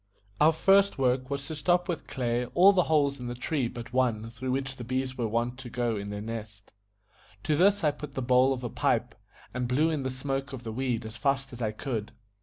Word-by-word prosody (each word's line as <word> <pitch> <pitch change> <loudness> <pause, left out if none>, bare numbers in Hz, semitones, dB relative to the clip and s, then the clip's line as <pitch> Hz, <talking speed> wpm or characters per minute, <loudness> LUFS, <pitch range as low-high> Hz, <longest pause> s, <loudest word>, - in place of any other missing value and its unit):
Our 155 +2 +6
first 195 +4 +4
work 130 0 +1
was 140 -1 -3
to 160 - -5
stop 175 +4 +1
with 175 -4 -3
clay 120 -1 -1
all 195 +3 +7
the 180 -3 +3
holes 145 -3 +2
in 125 - -5
the 120 - -4
tree 130 +1 -1
but 120 0 -8
one 115 -3 +1
through 125 +3 -5
which 135 0 -2
the 120 - -6
bees 130 +2 -2
were 120 -3 -1
wont 120 +3 -1
to 130 -2 -7
go 120 -1 -1
in 100 -1 -4
to - - -6
their 105 0 -5
nest. 110 -2 -7 0.7
To 150 +1 +1
this 200 +5 +4
I 150 - +4
put 145 -1 -9
the 130 - -1
bowl 125 +2 +4
of 130 -2 -2
a 120 - -2
pipe, - - 0 0.4
and 125 0 -2
blew 150 +6 +2
in 155 -3 -1
the 130 - -2
smoke 135 +1 -3
of 125 -2 -7
the 115 - -5
weed 120 -1 -2
as 110 +1 -7
fast 135 -2 0
as 120 - -8
I 110 -2 0
could. 110 -1 -4
130 Hz, 240 wpm, -28 LUFS, 120-140 Hz, 0.7 s, all